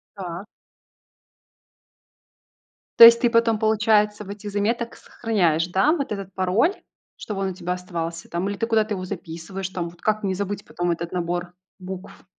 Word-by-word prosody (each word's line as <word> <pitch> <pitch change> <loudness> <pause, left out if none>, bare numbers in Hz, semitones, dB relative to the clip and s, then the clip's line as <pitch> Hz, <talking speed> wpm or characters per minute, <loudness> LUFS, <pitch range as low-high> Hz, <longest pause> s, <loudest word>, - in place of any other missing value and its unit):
Так. 180 0 -6 2.5
То 230 - +13
есть 235 0 +9
ты 240 -2 +3
потом, 230 -2 +2
получается, 210 -1 +2
в - - -13
этих 205 0 -7
заметок 230 +4 -1
сохраняешь, 175 -8 0
да, 195 - +3
вот 285 -8 -2
этот 195 -2 -5
пароль, 195 - +2 0.4
чтобы 195 -2 -5
он 190 - 0
у - - -6
тебя 180 0 -3
оставался 170 -2 -5
там, 175 +3 -2
или 200 - -3
ты 230 - -1
куда-то 220 -2 +1
его 185 -1 -5
записываешь 185 +1 -6
там? 175 -2 -4
Вот 170 - -16
как 215 -1 0
не 190 -1 0
забыть 200 +1 -4
потом 175 0 -2
этот 170 +1 -3
набор 175 0 -2 0.3
букв? 185 +1 -9
195 Hz, 165 wpm, -23 LUFS, 175-215 Hz, 2.5 s, То